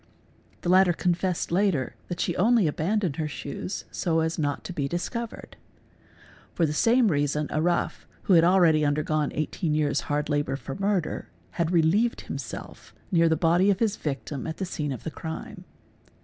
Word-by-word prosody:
' - - -33
The 175 - -1
latter 185 -1 +5
confessed 180 0 -1
later 175 -8 +1
that 175 -1 -5
she - - 0
had 175 - -4
only 230 -1 +4
abandoned 170 +1 0
her 155 - -1
shoes 145 +5 -5
so 165 -3 0
as 160 +1 -1
not 145 -2 -1
to 180 - -6
be 145 -5 -1
discovered. 225 - -5 1.0
For 170 - +3
the 150 - -1
same 230 +7 +4
reason 145 -1 0
a 155 - 0
rough 175 +1 -1 0.2
(who 195 - +3
had 165 -2 +7
already 170 -4 +5
undergone 150 0 0
18 155 +1 -2
years 150 -2 +1
hard 145 0 0
labour 145 -2 0
for 140 - -6
murder) 195 -3 -1 0.2
had 170 -2 -1
relieved 180 +8 +2
himself - - -8 0.2
near 170 -2 +4
_ - - +3
the 160 - +2
body 175 +4 +3
of 195 - +3
his 215 -1 +1
victim 140 -3 -4
at 160 - -5
the 190 - -2
scene 150 -5 -3
of 130 - -6
the 160 - -4
crime. 160 +1 -7
165 Hz, 185 wpm, -26 LUFS, 150-185 Hz, 1.0 s, had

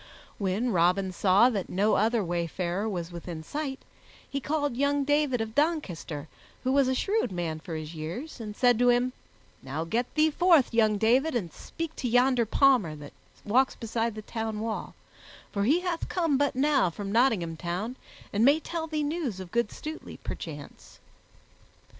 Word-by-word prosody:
When 205 +5 0
Robin 180 +1 +2
saw 195 +7 +4
that 200 -5 -3
no 205 +4 +2
other 225 +1 +2
wayfarer 175 +3 -2
was 175 -4 -4
within 170 -2 -7
sight, 280 - -4 0.5
he 275 - -3
called 290 -2 -1
young 285 +2 +1
David 290 -4 +2
of 220 0 -4
Doncaster, 215 - -1 0.4
who 260 - +1
was 275 -1 +4
a 260 - +1
shrewd 410 - 0
man 170 -3 -3
for 160 +1 -7
his 155 +1 -6
years, 170 - -6
and 210 -2 -6
said 245 -2 +3
to 245 0 +5
him, 245 +1 +2 0.5
"Now 140 +5 -4
get 230 +9 -1
thee 310 0 +4
forth, 330 -6 +4
young 215 -2 +3
David, 250 +8 +3
and 175 -9 -2
speak 330 -1 -6
to 250 - -2
yonder 245 -1 +3
palmer 240 - +3
that 145 -1 -11 0.3
walks 255 +6 +3
beside 230 0 -2
the 215 - -7
town 220 -1 -4
wall, 220 0 -4 0.6
for 200 -1 0
he 310 +9 +3
hath 355 -2 -3
come 330 -6 +1
but 285 0 +1
now 275 -7 +3
from 195 +4 -6
Nottingham 215 -8 +2
Town, 180 +9 -4 0.4
and 205 +2 +2
may 285 +5 +6
tell 325 +1 -4
thee 305 -1 -1
news 290 - -2
of 185 -2 -8
good 235 -2 +1
Stutely, 310 +1 -7
perchance." 145 -3 -8
230 Hz, 170 wpm, -28 LUFS, 185-280 Hz, 0.6 s, may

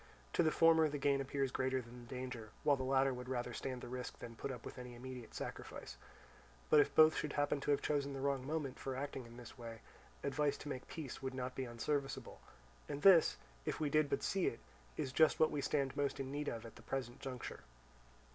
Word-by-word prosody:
To - - +4
the 160 - +4
former 160 -1 +6
the 145 - -2
gain 140 0 +2
appears 135 -1 -1
greater 130 0 +1
than 120 0 -9
the 120 - -13
danger, 125 -4 -5
while 145 -2 +5
the 135 - -5
latter 135 +1 +3
would 125 0 -6
rather 125 -2 -2
stand 130 -1 -4
the - - -6
risk 125 0 -5
than 115 -1 -8
put 140 - -4
up 125 -3 -7
with - - -7
any 125 -1 -7
immediate 125 -1 -8
sacrifice. - - -6 0.8
But 150 - +8
if 145 - +3
both 155 0 +8
should 150 - -2
happen 145 0 +1
to 145 - -3
have 145 - +3
chosen 140 -1 +1
the 135 - -4
wrong 135 -1 0
moment 150 -4 -2
for 135 -1 -3
acting 135 -2 -4
in 115 +1 -12
this 125 +1 -11
way, 115 -2 -7 0.4
advice 140 +1 +1
to 145 - -7
make 130 -2 -5
peace 150 -6 -6
would 130 -1 -3
not 130 0 -3
be 130 - -3
unserviceable; 135 +4 -2 0.5
and 145 0 -4
this, 185 -5 +8 0.3
if 155 - -2
we 150 -2 0
did 155 -1 +4
but - - 0
see 195 -2 +1
it, 115 - -2 0.4
is 130 - -1
just 155 +3 +5
what 155 - +5
we 145 - -1
stand 140 -2 0
most 140 0 0
in 135 -1 -3
need 145 +1 -2
of 115 0 -3
at 115 - -10
the - - -12
present 125 0 -3
juncture. 130 -3 -5
135 Hz, 230 wpm, -37 LUFS, 125-145 Hz, 0.8 s, But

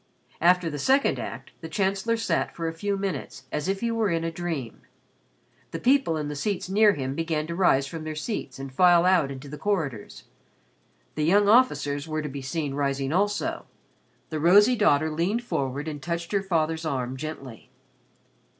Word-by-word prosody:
After 180 +1 +4
the 150 -2 -4
second 270 - +2
act - - -7
the 160 - -7
Chancellor 195 +6 0
sat 205 -7 -1
for 165 -1 -3
a 165 - -3
few 200 +4 -2
minutes 195 -2 -4
as 150 - -2
if 195 0 -1
he 235 0 0
were 225 -2 +1
in 165 -1 0
a 165 - -2
dream. 160 -8 -5 0.9
The - - -5
people 260 - +2
in 150 -1 -3
the 145 - -5
seats 185 +4 -2
near 205 +2 +4
him 135 -2 -3
began 160 0 -2
to 170 - -5
rise 155 -7 +3
from 160 +3 -7
their 155 0 -5
seats 155 - -4
and 135 -1 -8
file 175 +2 +5
out 180 -6 +3
into 135 +1 -8
the 150 +2 -8
corridors. 155 - -3 0.9
The 150 - -2
young 200 +5 +4
officers 145 - +3
were 155 -1 -2
to 150 - -4
be 140 0 -6
seen 140 +1 -3
rising 140 0 -1
also. 205 - -1 0.6
The 155 - -2
rosy 205 +9 +6
daughter 160 -8 +3
leaned 185 +10 -1
forward 140 - -3
and 150 -2 -5
touched 170 +2 -4
her 200 -2 +1
father's 165 -4 -1
arm 130 -5 -2
gently. 135 -5 -8
165 Hz, 185 wpm, -26 LUFS, 145-195 Hz, 0.9 s, rosy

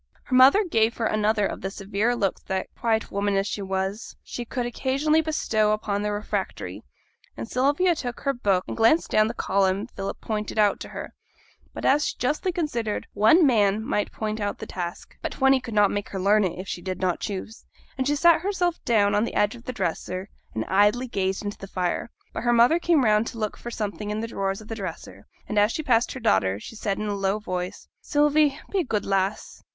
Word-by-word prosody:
Her 255 - -1
mother 270 +11 +7
gave 225 -8 +1
her 230 - -1
another 215 -1 +2
of - - -4
the 195 - -3
severe 205 +4 -1
looks 200 -6 -1
that, 190 0 -3
quiet 225 -1 0
woman 200 0 0
as 195 - +1
she 205 - -3
was, 190 +3 -3
she 240 - -6
could 245 +1 -3
occasionally 275 +6 +1
bestow 220 -9 +1
upon 205 -1 -2
the 210 0 -1
refractory, 205 +1 -4 0.6
and - - -5
Sylvia 285 +9 +2
took 245 -6 -5
her 275 - 0
book 200 -7 +1
and - - -4
glanced 230 +9 +3
down 215 0 +4
the 230 - -4
column 195 0 +1
Philip 195 -5 -6
pointed 215 -1 -4
out 210 -2 +3
to - - -8
her; - - -7 0.6
but, - - -6
as 290 +2 +4
she - - -2
justly 300 +8 0
considered, 240 - -2
one 225 - +5
man 215 -4 +3
might 210 - -1
point 215 0 -3
out 205 -1 -2
the - - -7
task, 175 -2 -6
but - - -3
twenty 270 -1 +4
could 230 -3 -7
not 205 -1 +5
make 205 0 -3
her 195 - -4
learn 205 +2 +4
it, 180 - -3
if 185 +1 -7
she 175 - -4
did 185 0 -4
not 185 -2 0
choose; 205 +3 -5 0.3
and 260 -1 -1
she 295 - +2
sat 335 +2 +5
herself 360 -3 -1
down 205 -3 +3
on 205 +1 +3
the 235 - -4
edge 205 +1 +2
of 240 -1 -13
the - - -3
dresser, 185 -3 -3 0.3
and 110 - -2
idly 210 +6 +3
gazed 195 -2 -2
into 205 - -5
the 195 - -8
fire. 180 +3 -2 0.2
But - - -3
her 240 0 +2
mother 240 +8 +5
came 335 -5 +3
round 215 +1 +3
to - - -7
look 215 -2 -2
for 240 - -8
something 210 -2 -4
in 210 +1 -2
the 230 - -3
drawers 195 -2 -2
of 215 - -13
the 225 - -5
dresser, 190 -7 -7 0.2
and 210 - +1
as 205 +2 +4
she 315 - -3
passed 235 -4 +2
her 260 - -6
daughter 100 - +2
she 225 - -10
said 200 -2 -2
in 215 - -3
a 205 - -1
low 195 0 0
voice 185 -2 -5
'Sylvie, 295 -1 +2
be 395 - +1
a - - +2
good 215 -7 -2
lass. 195 +1 -1
215 Hz, 225 wpm, -25 LUFS, 200-250 Hz, 0.6 s, mother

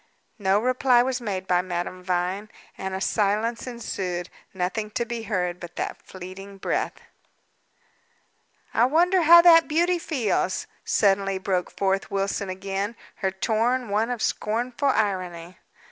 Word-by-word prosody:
No 195 0 +3
reply 250 +1 +3
was 255 0 -2
made 195 -5 -3
by 180 -2 +2
Madame 180 0 -4
Vine, 185 +3 -2 0.3
and 190 0 -4
a - - -3
silence 215 +4 0
ensued; 185 -7 -4 0.2
nothing 190 +4 -2
to 235 +2 -2
be 235 0 -4
heard 180 -5 -2
but 175 0 -9
that - - -4
fleeting 190 +2 -10
breath. - - -1 1.8
"I 235 - +4
wonder 350 +7 +3
how 340 +1 +8
that 330 -2 +7
beauty 345 +3 +2
feels?" 230 - -1 0.2
suddenly 195 -1 +2
broke 185 -1 -1
forth 195 0 -1
Wilson 195 0 -1
again, 195 +3 -3 0.2
her 190 - 0
tone 230 +5 0
one 215 +3 +1
of 245 -3 -2
scornful 240 +6 0
irony. 185 -6 -2
200 Hz, 135 wpm, -25 LUFS, 190-240 Hz, 1.8 s, how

